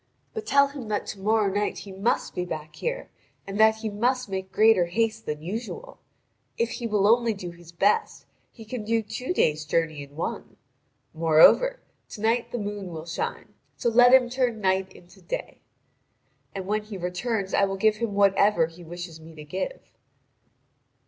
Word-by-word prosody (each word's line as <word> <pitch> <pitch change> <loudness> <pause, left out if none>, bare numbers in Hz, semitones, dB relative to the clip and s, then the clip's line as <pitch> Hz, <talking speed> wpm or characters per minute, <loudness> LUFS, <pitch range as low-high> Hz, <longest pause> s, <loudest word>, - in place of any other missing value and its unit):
But 440 -1 -6
tell 280 0 +5
him 275 -5 -8
that 210 -1 -2
to 200 - -17
morrow 210 0 +2
night 205 +1 -1
he 200 - -9
must 195 +5 -1
be 180 - -2
back 155 -3 -6
here, - - -4 0.3
and 195 +1 -5
that 220 0 +6
he 220 0 -4
must 250 +3 0
make 190 0 -4
greater 215 -5 +4
haste 225 +4 -1
than 150 0 -4
usual. 235 - -6 0.6
If 230 0 0
he 235 - -4
will 210 -3 +1
only 230 0 +4
do 180 -3 -7
his 170 -1 -15
best, 195 +4 +1 0.3
he 225 - -13
can 220 0 -5
do 225 +1 0
two 220 +8 -5
days' 155 - +1
journey 160 -1 -1
in 140 0 -12
one. 165 - -5 0.6
Moreover, 165 - +5 0.3
to 210 - -9
night 230 +2 +1
the - - -3
moon 205 -2 -4
will 160 -2 -7
shine; 170 0 -4 0.2
so 235 - +1
let 245 +2 +7
him 260 -1 +6
turn 245 -2 -1
night 190 -1 +1
into 175 0 -18
day. - - -6 0.9
And 190 -1 -4
when 210 +2 0
he 210 -2 -7
returns 190 +3 -2
I 200 - +4
will 195 0 -3
give 215 +2 +3
him 220 -3 -3
whatever 200 -3 +4
he 165 +2 -12
wishes 170 -1 -8
me 160 0 -13
to 150 - -9
give." 185 - -4
205 Hz, 180 wpm, -26 LUFS, 180-230 Hz, 0.9 s, let